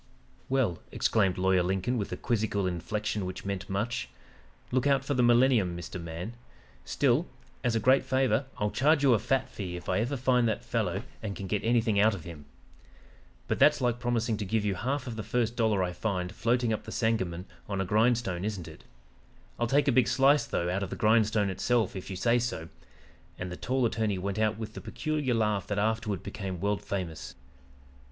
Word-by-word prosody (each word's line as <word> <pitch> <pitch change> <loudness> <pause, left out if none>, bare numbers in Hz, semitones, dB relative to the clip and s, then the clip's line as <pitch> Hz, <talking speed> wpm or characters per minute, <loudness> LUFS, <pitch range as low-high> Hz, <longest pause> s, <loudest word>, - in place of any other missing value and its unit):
"'Well,' 130 -11 +1
exclaimed 100 -5 +1
Lawyer 95 0 +3
Lincoln 95 +7 0
with 105 -4 -3
a - - -3
quizzical 105 -4 0
inflection 105 +4 -2
which 95 +1 -6
meant 100 0 -4
much. 100 - -2 0.6
'Look 130 +2 +2
out 135 -1 +2
for 145 - 0
the 125 - +2
millennium, 120 -7 +4
Mr. 85 +1 -6
Man 85 +6 -6 0.5
still, 135 - +1 0.4
as 120 -3 +1
a - - +3
great 130 +5 +4
favor, 130 0 +1
I'll 105 0 0
charge 145 +2 +3
you 135 -3 +6
a 110 - +3
fat 135 +3 0
fee 90 -4 -6
if 90 - -8
I - - +1
ever 125 +6 -1
find 125 -1 +3
that 115 +2 -2
fellow 105 -4 -1 0.2
and 105 -3 -4
can 100 - -6
get 100 +2 -1
anything 115 -3 +2
out 105 +1 +4
of 90 - -9
him. 80 -4 -10 1.0
But - - -1
that's - - +6
like 120 -1 0
promising 120 -2 0
to 105 - -3
give 105 +2 0
you 100 - +1
half 130 +8 -2
of 115 -3 -6
the - - -2
first 115 +2 -1
dollar 110 -5 +2
I 90 -1 -2
find 90 -3 -2
floating 120 0 +1
up 110 - -4
the - - -7
Sangamon 95 -7 -1 0.2
on 100 -1 -2
a 95 - 0
grindstone, 110 -3 +1
isn't 100 -6 -3
it? 80 - -12 0.8
I'll 120 - +1
take 140 +3 +2
a - - +5
big 130 0 +4
slice, 140 +2 +4
though, 85 - -1
out 90 +3 -1
of 100 - -3
the - - -4
grindstone 105 -2 +3
itself, 115 +2 0
if 95 - -6
you 95 - -4
say 115 +6 +2
so,' 115 -9 -3 0.7
and 90 0 -5
the - - -4
tall 130 +5 0
attorney 110 -3 0
went 100 +3 -3
out 110 0 +1
with 110 -1 -6
the - - -7
peculiar 150 -6 -1
laugh 105 -4 0
that 105 - -2
afterward 110 -1 -1
became 95 -4 -5
world 100 +2 0
famous. 80 -9 -5
110 Hz, 205 wpm, -29 LUFS, 95-120 Hz, 1.0 s, you